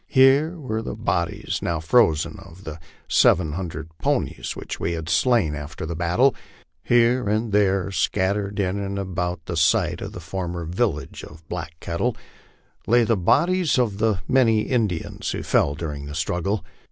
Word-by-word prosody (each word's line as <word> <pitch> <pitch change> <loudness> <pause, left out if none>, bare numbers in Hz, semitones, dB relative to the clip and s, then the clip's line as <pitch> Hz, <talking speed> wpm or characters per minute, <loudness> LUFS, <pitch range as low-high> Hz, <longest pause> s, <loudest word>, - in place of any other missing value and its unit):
Here 140 +6 +4
were 110 -6 -3
the 110 - -5
bodies, 85 -6 -2
now 85 -1 -1
frozen, 80 0 +2
of 95 -1 -14
the 80 +1 -7 0.3
seven 85 -3 +4
hundred 80 -2 -5
ponies - - -1
which - - -6
we 85 - -1
had 80 -1 -5
slain 100 -2 +3
after 75 +2 -6
the 85 +1 -4
battle; 90 +11 +3 0.5
here 120 -1 +3
and 110 +1 0
there, 100 -2 +2
scattered 100 +3 0
in 95 0 0
and 100 0 -3
about 90 -3 -3
the 85 - -4
site 80 0 +2
of - - -6
the - - -7
former 85 0 -4
village 85 -2 -2
of 80 +1 -13
Black 80 - -5
Kettle, 105 +8 -2 0.7
lay 120 +1 +5
the 115 0 +2
bodies 170 - +2
of 110 -5 0 0.3
many 115 -5 +4
of - - -7
the - - -1
Indians 105 -9 -1
who - - -3
fell 70 - +2
during 75 -3 -5
the 75 - -7
struggle. 90 +6 -1
95 Hz, 165 wpm, -23 LUFS, 80-115 Hz, 0.7 s, lay